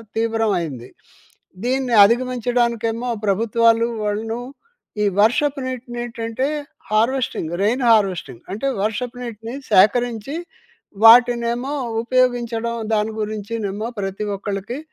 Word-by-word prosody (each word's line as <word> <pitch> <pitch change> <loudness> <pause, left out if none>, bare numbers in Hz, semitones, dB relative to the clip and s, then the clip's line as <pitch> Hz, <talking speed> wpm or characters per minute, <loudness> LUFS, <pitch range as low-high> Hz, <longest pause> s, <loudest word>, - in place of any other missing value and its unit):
తీవ్రమైంది. 200 - -1 0.8
దీన్ని 255 -1 0
అధిగమించడానికేమో 240 0 0 0.2
ప్రభుత్వాలు 230 +3 +3 0.2
వాళ్ళను 220 +3 -2 0.6
ఈ - - +3 0.2
వర్షపు 275 +6 +2
నీటిని 250 -1 -5
ఏంటంటే 230 +2 -3 0.4
హార్వెస్టింగ్, 225 -6 0
రెయిన్ 235 +6 +1
హార్వెస్టింగ్. 195 - +1
అంటే 220 +8 -2
వర్షపు 235 +4 -2
నీటిని 230 0 -7 0.2
సేకరించి 225 +6 +3 0.7
వాటినేమో 240 +2 +5 0.3
ఉపయోగించడం 240 -2 0 0.2
దాని 215 0 +1
గురించినేమో 215 0 -4
ప్రతి 195 +2 -3
ఒక్కళ్ళకి 200 +5 -5
230 Hz, 90 wpm, -21 LUFS, 210-245 Hz, 0.8 s, వాటినేమో